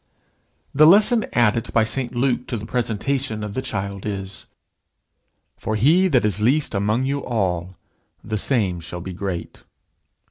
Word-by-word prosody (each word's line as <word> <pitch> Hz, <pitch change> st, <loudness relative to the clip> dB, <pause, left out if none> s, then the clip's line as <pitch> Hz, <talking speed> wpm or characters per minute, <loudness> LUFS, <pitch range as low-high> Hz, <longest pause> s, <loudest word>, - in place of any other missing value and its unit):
The 155 Hz, +2 st, +6 dB
lesson 215 Hz, +5 st, +5 dB
added 115 Hz, -1 st, +2 dB
by 115 Hz, -, +4 dB
St 120 Hz, +2 st, -3 dB
Luke 125 Hz, 0 st, 0 dB
to 120 Hz, -, -2 dB
the 105 Hz, -, -7 dB
presentation 115 Hz, 0 st, -2 dB
of 105 Hz, -1 st, -5 dB
the 130 Hz, -, -2 dB
child 100 Hz, -5 st, -4 dB
is: 95 Hz, -2 st, -6 dB, 1.1 s
"For 110 Hz, -, -3 dB
he 160 Hz, -, +4 dB
that 130 Hz, -10 st, +2 dB
is 105 Hz, -1 st, -1 dB
least 140 Hz, +6 st, +2 dB
among 105 Hz, +5 st, 0 dB
you 140 Hz, +1 st, -2 dB
all, 95 Hz, -6 st, -2 dB, 0.5 s
the 110 Hz, -1 st, -3 dB
same 100 Hz, -8 st, 0 dB
shall 90 Hz, +1 st, -7 dB
be 95 Hz, +1 st, -6 dB
great." 95 Hz, -2 st, -5 dB
110 Hz, 150 wpm, -22 LUFS, 100-130 Hz, 1.1 s, The